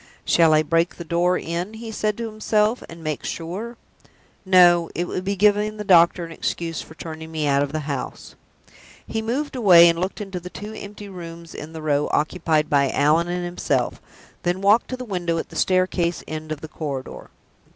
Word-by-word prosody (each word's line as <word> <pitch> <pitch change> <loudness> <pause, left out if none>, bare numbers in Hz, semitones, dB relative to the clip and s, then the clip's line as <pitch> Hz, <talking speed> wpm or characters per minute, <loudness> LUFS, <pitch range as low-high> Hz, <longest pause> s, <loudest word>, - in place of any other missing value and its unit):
"Shall 165 -2 +4
I 155 - +4
break 165 +3 +1
the 170 - -7
door 175 +2 +1
in," 175 +6 -4
he 225 0 -7
said 210 -1 -1
to 235 - -3
himself, 215 +1 +1
"and 165 0 -11
make 155 -2 -3
sure? 200 +9 -5 0.7
No; 175 -3 +5
it 175 - -1
would 185 - -3
be 200 +1 -1
giving 210 +2 +2
the 210 - -4
doctor 175 -2 +5
an 165 - -10
excuse 165 0 -3
for 160 - -13
turning 160 -1 -8
me 155 -2 -2
out 140 -1 +3
of 145 -1 -1
the 155 0 -2
house." 140 -3 -5 0.7
He 220 - -3
moved 265 +6 -2
away, 180 -8 +8
and 170 0 +2
looked 185 +2 -3
into 195 -3 -5
the 180 +1 -9
two 210 +3 -8
empty 205 -1 -9
rooms 170 -3 -9
in 155 +2 -8
the 160 -1 -7
row 145 -1 +1
occupied 155 0 +1
by 140 -2 +3
Allan 155 +5 +2
and 175 0 -2
himself, 175 0 -1 0.4
then 175 +1 -1
walked 205 +4 +4
to 255 - -5
the 250 - -6
window 175 -5 -2
at - - -4
the - - -13
staircase 185 -2 +1
end 155 0 -6
of 155 -1 -4
the 160 - -7
corridor. 140 -4 -6
175 Hz, 200 wpm, -23 LUFS, 160-200 Hz, 0.7 s, away